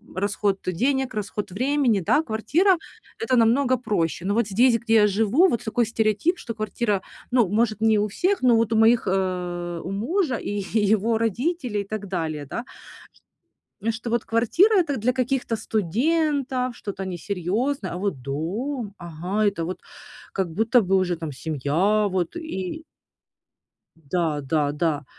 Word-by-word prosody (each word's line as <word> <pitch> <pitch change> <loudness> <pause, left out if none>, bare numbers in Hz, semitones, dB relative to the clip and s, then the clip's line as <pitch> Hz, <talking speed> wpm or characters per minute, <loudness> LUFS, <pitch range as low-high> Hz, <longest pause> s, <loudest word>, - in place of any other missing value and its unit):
расход 200 0 0
денег, 255 +8 0
расход 210 -1 -4
времени, 255 0 +1
да? 295 - +2
Квартира- 320 - +2 0.4
это 445 -12 +1
намного 250 +3 +3
проще. 175 -7 -1
Но 200 - +1
вот 235 -2 +2
здесь, 230 +4 +4
где 230 -1 -1
я 210 -1 +6
живу, 220 - +3
вот 235 - -1
такой 230 +2 +1
стереотип, 225 - +1
что 230 - -5
квартира, 215 -2 -1 0.3
ну, 245 -5 +4
может, 215 +2 0
не 220 -1 +4
у 210 - +1
всех, 365 - 0
но 240 -2 +5
вот 225 0 +1
у - - +2
моих, 225 0 +4
э, 180 -2 -2
у 185 - -5
мужа 265 - 0
и - - -6
е 205 0 -2
е 220 -2 +3
его 220 +2 +2
родителей 235 - -1
и - - -5
так 210 -1 -5
далее, 160 -5 -3
да? 230 - -5 1.3
Что 230 +1 -6
вот 235 -1 0
квартира- 340 - +3
это 305 -6 0
для 235 +4 +1
каких-то 255 -2 -1
студентов, 255 - 0
что-то 195 -2 -5
несерьезное, 195 - -2
а 175 - -4
вот 185 -9 -2
дом, 200 - -3
ага! 175 +5 -2
Это, 180 -5 0
вот, 185 - -5 0.5
как 190 -3 -1
будто 225 +5 +3
бы 195 0 +1
уже 180 -3 +1
там 160 -3 -5
семья, 160 - +1
вот 180 -3 -2
и 315 - -5 1.3
Да, 165 -5 0
да, 145 +1 0
да. 150 -1 -1
215 Hz, 160 wpm, -24 LUFS, 185-245 Hz, 1.3 s, я